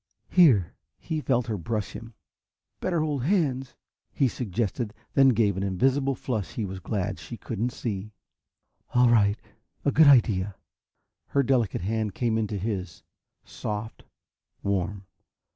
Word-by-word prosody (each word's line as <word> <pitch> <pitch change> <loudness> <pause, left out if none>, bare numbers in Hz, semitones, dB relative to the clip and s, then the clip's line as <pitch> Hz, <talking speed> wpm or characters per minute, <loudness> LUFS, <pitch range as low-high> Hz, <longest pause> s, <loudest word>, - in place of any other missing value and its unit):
"Here!" 125 - +5 0.2
He 155 -2 -3
felt 125 -4 +1
her 110 -5 -3
brush 105 +3 -3
him. 115 -1 -10 0.6
"Better 175 -3 0
hold 150 -4 -1
hands," 135 -8 0 0.4
he 135 - +2
suggested, 115 0 -2 0.2
then 135 -1 +6
gave 105 -5 +2
an - - -1
invisible 135 +8 +1
flush 110 -8 -3
he 110 - -2
was 95 0 -6
glad 100 +1 -3
she 120 - -8
couldn't 115 +2 -2
see. 105 -4 -5 0.8
"All 125 0 +6
right. 105 -3 +4 0.5
A 140 - +3
good 155 +1 +6
idea." 105 -8 +4 0.7
Her 140 - +2
delicate 125 -8 +1
hand 110 +1 -2
came 115 -3 0
into 105 -1 -2
his, 95 -4 -4 0.4
soft, 105 +1 -5 0.6
warm. 100 0 -1
115 Hz, 135 wpm, -26 LUFS, 100-130 Hz, 0.8 s, then